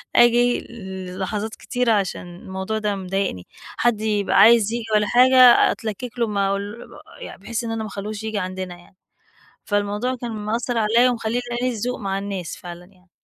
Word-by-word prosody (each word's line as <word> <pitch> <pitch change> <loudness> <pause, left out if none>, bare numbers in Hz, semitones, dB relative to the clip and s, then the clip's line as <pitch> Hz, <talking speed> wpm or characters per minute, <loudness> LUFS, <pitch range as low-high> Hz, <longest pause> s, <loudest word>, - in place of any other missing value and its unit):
آجي 240 0 +5
ل 190 -4 -8
لحظات 210 +3 -3
كتيرة 245 -2 -1
عشان 180 -3 -2
الموضوع 190 +4 -4
ده 210 -1 -1
مضايقني. 190 - -3 0.3
حد 230 -3 +1
يبقى 210 -2 +1
عايز 225 -2 +6
ييجي 235 -1 -2
والّا 210 -1 +2
حاجة 255 +1 +6
أتلكك 235 +2 -6
له 230 - +2
ما 200 -2 0
أقول 205 +4 -4 0.3
يعني - - -9
بحيث 235 0 -4
إن 225 - -4
أنا 225 -1 -3
ما 215 - -6
أخلّيهوش 210 +2 -6
ييجي 220 -2 -2
عندنا 185 -1 -5
يعني، 175 +2 -20 0.7
فالموضوع 205 +5 -1
كان 235 -1 -4
مأثر 225 +3 -2
عليَّ 230 +3 +4
ومخلّيني 235 0 -1 0.2
قليل 250 -1 0
الذوق 245 +3 -3
مع 195 -2 -2
الناس 195 -3 -5
فعلًا 175 0 -10
يعني. 185 -1 -25
210 Hz, 170 wpm, -22 LUFS, 195-235 Hz, 0.7 s, عايز